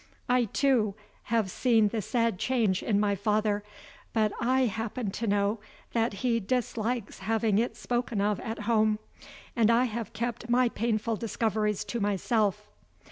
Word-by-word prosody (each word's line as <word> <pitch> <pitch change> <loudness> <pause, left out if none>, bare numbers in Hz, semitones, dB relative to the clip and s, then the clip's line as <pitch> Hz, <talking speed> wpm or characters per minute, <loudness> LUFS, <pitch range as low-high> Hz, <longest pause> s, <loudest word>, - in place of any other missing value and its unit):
I, 250 -1 +3
too, 225 -3 +1 0.3
have 220 -5 0
seen 225 -3 +3
the 220 0 -2
sad 230 -2 0
change 225 -7 +1
in 205 -2 +1
my 205 -1 +2
father; 210 +1 0 0.5
but 215 -2 +2
I 255 +2 +2
happen 225 -1 -2
to 225 +3 -3
know 205 +2 +1 0.3
that 230 0 +1
he 235 -2 +3
dislikes 235 0 -2
having 220 +1 +1
it 235 - -1
spoken 240 -3 -2
of 205 0 +1
at 225 -1 -5
home, 215 -1 +2 0.6
and 230 -2 +4
I 235 +2 +5
have 235 -2 -3
kept 235 +2 -4
my 245 0 +4
painful 225 0 -1
discoveries 215 -1 -1
to 220 +4 -3
myself. 210 0 0
225 Hz, 150 wpm, -28 LUFS, 210-235 Hz, 0.6 s, I